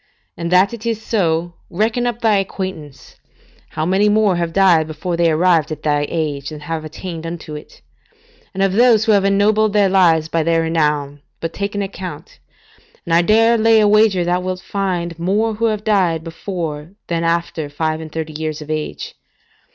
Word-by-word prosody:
And 170 +1 -4
that 185 +4 +4
it 230 -2 -8
is 230 -2 -1
so, 175 -6 -1 0.2
reckon 220 +6 0
up 240 -1 -3
thy 220 -3 +3
acquaintance, 185 -7 -6 0.5
how 155 0 -3
many 195 +4 +2
more 210 -3 +3
have 170 -1 -2
died 175 -4 +4
before 160 +3 -4
they 170 0 +2
arrived 165 -1 +2
at 155 -1 -6
thy 145 -1 +1
age 145 -4 -3
than 150 -1 -9
have 160 +1 -4
attained 165 +1 -7
unto 165 -2 -7
it; 150 - -12 0.7
and 195 - -1
of 195 -1 +1
those 225 -1 +4
who 220 - +3
have 200 -2 +4
ennobled 205 +2 +2
their 205 -2 +3
lives 170 -5 +3
by 165 0 0
their 165 +1 +1
renown, 150 -3 -1 0.2
take 200 +5 -3
but - - -9
an 205 - -1
account, 195 - -8 0.7
and 170 - -2
I 170 - +5
dare 225 +5 +3
lay 225 0 +5
a 210 - +4
wager 210 -3 +4
thou 175 +1 +1
wilt 185 0 -4
find 175 -5 -3
more 210 +6 0
who 225 +2 -1
have 215 -2 -1
died 185 -7 +1
before 165 -2 -6
than 170 -1 -2
after 165 -2 -1
five 155 +2 -2
and 155 -1 -9
thirty 160 -1 -5
years 155 0 -4
of 155 0 -7
age. 155 -1 -4
175 Hz, 190 wpm, -18 LUFS, 160-205 Hz, 0.7 s, I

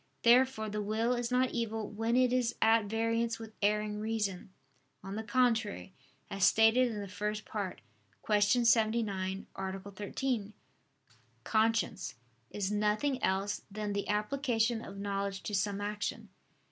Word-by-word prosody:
Therefore 240 -2 +4
the 210 0 -3
will 220 +4 0
is 240 -1 -2
not 255 0 +2
evil 225 -2 -2
when 225 +3 -1
it 250 -1 +4
is 245 -2 +1
at 225 -1 +4
variance 230 +2 0
with 225 -1 -10
erring 210 0 +1
reason. 210 -4 -2 0.5
On 195 +1 -6
the 220 - -2
contrary, 225 -5 0 0.3
As 195 -1 -3
stated 225 +5 +5
in 210 - -4
the 200 - -6
First 210 +2 -3
Part 200 -4 -4 0.4
(Q. 210 -1 +3 0.2
79, 215 -4 +1
A. 190 0 -4
13), 205 +3 -3 0.9
conscience 220 -5 +1 0.3
is 200 -1 -2
nothing 215 +6 +1
else 195 +2 0
than 210 0 -3
the 200 0 -2
application 225 +1 0
of 195 - -9
knowledge 200 -1 -3
to 210 - -5
some 200 0 0
action. 205 0 -4
215 Hz, 140 wpm, -32 LUFS, 205-230 Hz, 0.9 s, stated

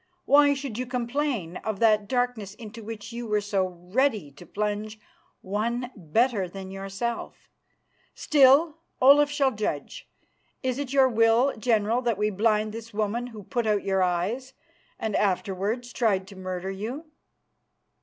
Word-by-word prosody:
Why 285 +1 +5
should 265 -5 -5
you 255 - -3
complain 240 - -2
of 215 -3 -4
that 215 -2 +3
darkness 245 -5 -1
into 225 0 -10
which 225 +1 -7
you 235 0 -5
were 210 -1 +2
so 200 -2 0
ready 185 - -1
to 145 +6 -14
plunge 210 +1 -3 0.4
one 235 +6 -2
better 200 - +1
than 190 +1 -8
yourself. 195 +4 -5 0.7
Still, 295 +3 +4 0.2
Olaf 285 +3 +6
shall 280 -2 +2
judge. 220 - -4 0.5
Is 260 0 -1
it 280 -3 -4
your 270 -1 +5
will, 230 +3 +3
General, 225 0 +1
that 235 -5 0
we 210 +1 +1
blind 215 +1 +1
this 225 0 -9
woman 220 +3 -1
who 220 -4 -10
put 240 +2 -2
out 210 -2 +1
your 190 -1 +1
eyes 185 +9 -1 0.4
and 220 -2 -2
afterwards 205 +5 -1
tried 200 -6 +1
to 200 - -12
murder 185 0 -4
you?" 230 +11 -5
220 Hz, 145 wpm, -26 LUFS, 200-250 Hz, 0.7 s, Olaf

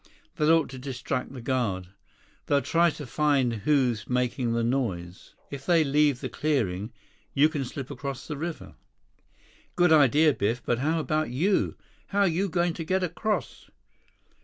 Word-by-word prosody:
That 150 0 +2
ought 165 -2 +4
to 130 - -8
distract 130 0 -4
the 130 -3 -9
guard. 110 -9 -1 0.6
They'll 140 -1 +2
try 170 +1 +3
to 150 -2 -7
find 140 -2 +1
who's 120 0 +1
making 125 -1 0
the 115 0 0
noise. 100 -8 -3 0.2
If 140 -1 -8
they 170 -3 +5
leave 145 -2 +2
the - - -2
clearing, 110 -9 -1 0.4
you 145 +2 +6
can 150 -3 -3
slip 135 +1 -6
across 135 0 -6
the 150 - -4
river." 160 +3 -6 1.0
"Good 175 -2 +4
idea, 150 +1 +5
Biff. 115 +3 -1
But 120 - 0
how 160 +4 +1
about 155 -1 -1
you? 170 +11 +1 0.3
How 200 0 +2
you 190 +2 +1
going 175 0 +1
to 165 - -5
get 185 +3 0
across?" 180 - -3
140 Hz, 160 wpm, -27 LUFS, 125-160 Hz, 1.0 s, you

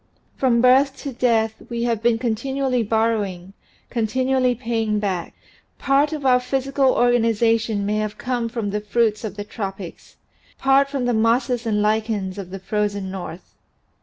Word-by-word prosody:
From 240 -3 +2
birth 265 +2 +4
to 280 -3 -4
death 225 -3 +1
we 235 -1 -2
have 230 -2 0
been 235 -1 +3
contin 235 +3 -2
ually 265 -3 +1
borrowing, 205 -5 -1 0.4
continually 255 +2 +1
paying 225 -3 -1
back. 190 -5 -3 0.4
Part 280 +2 +2
of 300 -3 -5
our 250 -1 +5
physical 270 +1 +1
organization 230 -3 +2
may 210 +1 0
have 215 0 -3
come 245 -2 -2
from 225 -3 -3
the 210 +1 -2
fruits 215 +1 0
of 210 -3 -5
the 205 - -5
tropics, 195 -4 -7 0.4
part 270 +1 +3
from 275 -3 -2
the 245 - +1
mosses 235 +2 +1
and 210 -1 +1
lichens 210 -3 -1
of 190 -2 -7
the 195 - -6
frozen 205 -1 -2
north. 180 -2 -8
230 Hz, 160 wpm, -22 LUFS, 210-250 Hz, 0.4 s, our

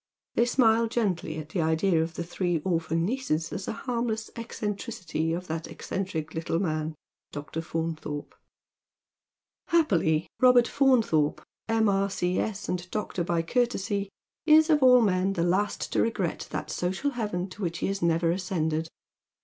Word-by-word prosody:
They 235 - +3
smile 230 -2 +4
gently 195 -9 -1
at 155 -1 -7
the 170 +1 -1
idea 160 +2 +2
of 165 +1 -3
the 170 - -3
three 175 0 -1
orphan 165 -2 0
nieces 185 - -1
as 190 - -5
a - - -1
harmless 235 -3 -2
eccentricity 205 -8 -3
of 175 +2 -3
that 160 -1 -4
eccentric 160 -5 -4
little 165 0 -1
man, 155 -3 -1 0.4
Dr. 150 +2 -5
Faunthorj^. 160 -2 -4 1.4
Happily 175 - +2
Robert 250 -2 +6
Faunthorpe, 230 - +2 0.2
M.R.C.S., 200 -2 0
and 180 0 -3
Dr. 210 -4 -2
by 170 -1 0
courtesy, 205 -2 0 0.4
is 315 +1 +6
of 300 -2 +4
all 250 -1 +7
men 190 -2 +2
the 170 - 0
last 190 +4 0
to - - +3
regret 205 -7 -1
that 155 - -4
social 190 +11 -1
heaven 210 -7 -2
to 205 - -11
which 175 -2 -2
he - - -2
has 195 0 -2
never 165 0 +2
ascended. 165 -3 -1
185 Hz, 145 wpm, -27 LUFS, 165-225 Hz, 1.4 s, all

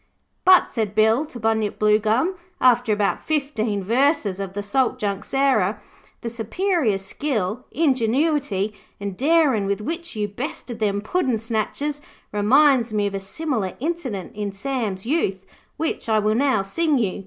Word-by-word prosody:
'But,' 370 -1 +6
said 215 -3 -2
Bill 220 +7 +3
to 245 - -9
Bunyip 220 -2 0
Bluegum, 215 - +2 0.3
after 245 -2 +4
about 205 -1 +1
fifteen 235 -10 -1
verses 235 - +1
of 195 -1 -4
the 205 0 -4
Salt 260 +4 +1
Junk 200 0 -2
Sarah, 255 -8 +1 0.4
'the 235 - -3
superior 240 - 0
skill, 215 +2 -3
ingenuity 260 - +1 0.3
and 200 -2 -4
darin' 275 - +3
with 200 +1 0
which 335 +8 -5
you 210 -1 -1
bested 240 +1 -6
them 205 -2 0
puddin' 255 - 0
snatchers 230 +7 -2 0.3
reminds 245 +3 +4
me 210 -1 0
of 200 - -2
a 195 - -2
similar 215 - -3
incident 265 - -4
in 205 -1 -3
Sam's 205 -3 -3
youth, 200 - 0 0.3
which 315 -6 -3
I 220 - +3
will 215 0 +2
now 255 -4 +2
sing 300 +9 +1
you. 205 -6 -1
225 Hz, 150 wpm, -23 LUFS, 205-280 Hz, 0.4 s, But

